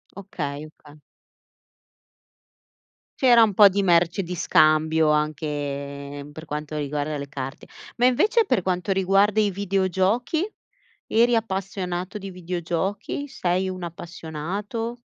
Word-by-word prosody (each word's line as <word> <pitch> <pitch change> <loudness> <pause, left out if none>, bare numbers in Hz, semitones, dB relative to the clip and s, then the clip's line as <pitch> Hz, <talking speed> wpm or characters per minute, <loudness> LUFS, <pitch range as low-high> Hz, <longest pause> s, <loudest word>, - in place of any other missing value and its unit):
Okay, 155 -7 -5
oka 150 -1 -18 2.2
C'era 245 -4 +7
un 210 -3 +2
po' 205 +1 +8
di 200 +1 0
merce 175 +1 +3
di 180 +1 -5
scambio, 155 0 +3
anche 145 -2 -3
per 160 - -9
quanto 150 0 -5
riguarda 150 0 -2
le 140 0 -7
carte. 135 -1 -6 0.3
Ma 245 +1 +4
invece 420 - +3
per 195 - +1
quanto 180 +1 -1
riguarda 195 +2 +3
i 210 -2 +2
videogiochi, 195 - 0 0.6
eri 235 +2 +3
appassionato 190 -2 -3
di 195 -1 -7
videogiochi? 180 - -3
Sei 185 -3 -1
un 185 -1 -6
appassionato? 175 +7 -5
180 Hz, 115 wpm, -24 LUFS, 155-200 Hz, 2.2 s, po